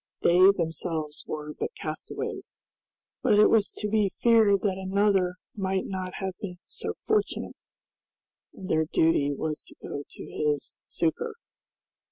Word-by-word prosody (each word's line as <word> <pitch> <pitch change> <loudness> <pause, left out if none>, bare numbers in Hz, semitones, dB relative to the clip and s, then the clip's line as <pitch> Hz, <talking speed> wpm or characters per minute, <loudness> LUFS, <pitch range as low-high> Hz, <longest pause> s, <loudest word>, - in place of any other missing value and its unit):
They 175 +1 +5
themselves 160 -4 -2
were 150 0 -5
but 460 - -4
castaways, - - -5 0.7
but 220 -6 +4
it 210 - +7
was 215 -2 +3
to 210 - -3
be 210 -1 +2
feared 220 -3 +4
that 190 -2 0
another 190 -1 +2 0.2
might 190 -2 -1
not 185 -1 -4
have 190 -1 -3
been 180 -3 -5
so - - -4
fortunate, 430 -1 0 1.0
and 190 - -9
their 160 -2 +2
duty 155 -3 +3
was 155 +2 -3
to - - -15
go 145 - -5
to - - -9
his 150 -2 -2
succor. 410 - -1
190 Hz, 140 wpm, -27 LUFS, 160-205 Hz, 1.0 s, it